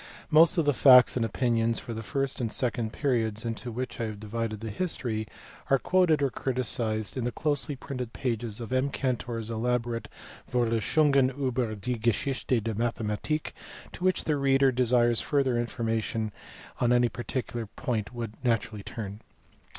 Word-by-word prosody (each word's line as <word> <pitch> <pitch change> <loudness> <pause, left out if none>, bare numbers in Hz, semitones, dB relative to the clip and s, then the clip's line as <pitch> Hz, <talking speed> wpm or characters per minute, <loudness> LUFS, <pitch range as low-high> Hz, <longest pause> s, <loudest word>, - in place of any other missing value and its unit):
Most 165 +3 +6
of 165 - +3
the 145 - +3
facts 125 -1 +7
and 120 - +1
opinions 115 0 +1
for 115 - -6
the 110 - -5
first 135 +6 -2
and 115 -2 -1
second 120 -3 -1
periods 115 -5 -1
into 115 +2 -4
which 125 +1 -4
I - - 0
have 110 -2 -6
divided 110 0 -3
the 110 0 -5
history 110 - -1 0.4
are 135 - +5
quoted 165 -1 +3
or 135 - +1
criticized 115 -5 -1
in 130 - -1
the 120 - -1
closely 145 +1 -1
printed 125 -3 -6
pages 115 -4 -2
of 120 +1 -5
M. 130 +2 +2
Cantor 125 -3 -2
s 115 0 -3
elaborate 120 0 -1 0.4
Vorlesungen 130 +4 +3
ilber 125 -5 -1
die 120 +4 -3
Geschichte 120 +3 0
der 115 0 -2
Mathematik, 115 +6 -2 0.4
to - - -9
which 185 0 +2
the 150 -2 0
reader 135 -1 +4
who - - +1
desires 120 -2 +3
further 135 -4 +1
information 115 -2 -1 0.5
on 120 - +2
any 120 0 +4
particular 120 -1 -4
point 110 0 -3
would 115 -2 -7
naturally 115 -3 0
turn. 100 0 -7
120 Hz, 165 wpm, -28 LUFS, 115-130 Hz, 0.5 s, facts